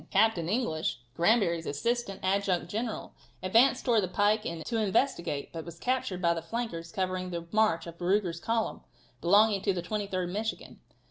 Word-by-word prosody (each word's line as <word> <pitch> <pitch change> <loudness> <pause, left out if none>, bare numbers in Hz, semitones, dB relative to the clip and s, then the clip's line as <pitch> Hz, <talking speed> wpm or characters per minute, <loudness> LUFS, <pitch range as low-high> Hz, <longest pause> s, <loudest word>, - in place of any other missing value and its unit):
Captain 195 -5 +3
English, 170 - 0 0.2
Granbury's 170 -2 +2
assistant 230 +7 -2
adjutant 190 -2 +1
general, 220 +4 -4 0.3
advanced 245 +7 +4
towards 235 -4 +4
the 185 - -1
pike 205 +4 +2 0.2
to 235 - -1
investigate, 200 - 0
but 165 -1 -5
was 170 0 -10
captured 250 -5 -1
by 170 0 +4
the 165 - -4
flankers 170 -3 -4
covering 185 -1 -2
the 170 -1 -4
march 215 -7 +2
of 170 0 -10
Ruger's 180 -2 +1
column, 225 +3 -1 0.4
belonging 200 +3 +5
to 195 -1 +1
the 175 -2 -3
23d 190 -2 -2
Michigan. 215 +5 -4
195 Hz, 155 wpm, -29 LUFS, 170-220 Hz, 0.4 s, belonging